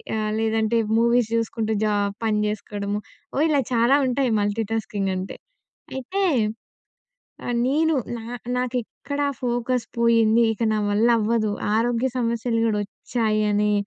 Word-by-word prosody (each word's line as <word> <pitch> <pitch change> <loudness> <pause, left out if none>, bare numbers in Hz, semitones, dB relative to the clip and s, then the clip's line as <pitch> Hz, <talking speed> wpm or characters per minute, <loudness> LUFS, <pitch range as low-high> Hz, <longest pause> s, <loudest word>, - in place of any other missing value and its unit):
ఆహ్, 215 -1 -1
లేదంటే 225 +1 +1 0.2
movies 235 -1 +3
జూసుకుంటూ, 225 -1 -1
job 205 -1 0
పని 210 -1 +1
చేసుకోవడము 205 -1 -3 0.4
ఓహ్! 290 - +2
ఇలా 285 -3 +3
చాలా 235 +4 +4
ఉంటాయి 255 -1 +1
మల్టీటాస్కింగ్ 205 -2 -1
అంటే. 185 +1 -5 0.6
అయితే 375 +10 -2 1.2
ఆహ్, 245 -1 -1
నేను 315 +4 +2 0.2
నా 225 - -9 0.3
నాకు 250 0 -2
ఎక్కడ 285 +5 -6 0.2
ఫోకస్ 245 0 -1
పోయింది, 230 0 +4
ఇక 230 - -5
నా - - +1
వల్ల 215 +3 +3
అవ్వదు, 215 -1 +1 0.2
ఆరోగ్య 240 +2 +1
సమస్యలు 230 -1 0
గూడా 210 -2 +1
వచ్చాయని 210 -1 0
225 Hz, 125 wpm, -23 LUFS, 215-245 Hz, 1.2 s, చాలా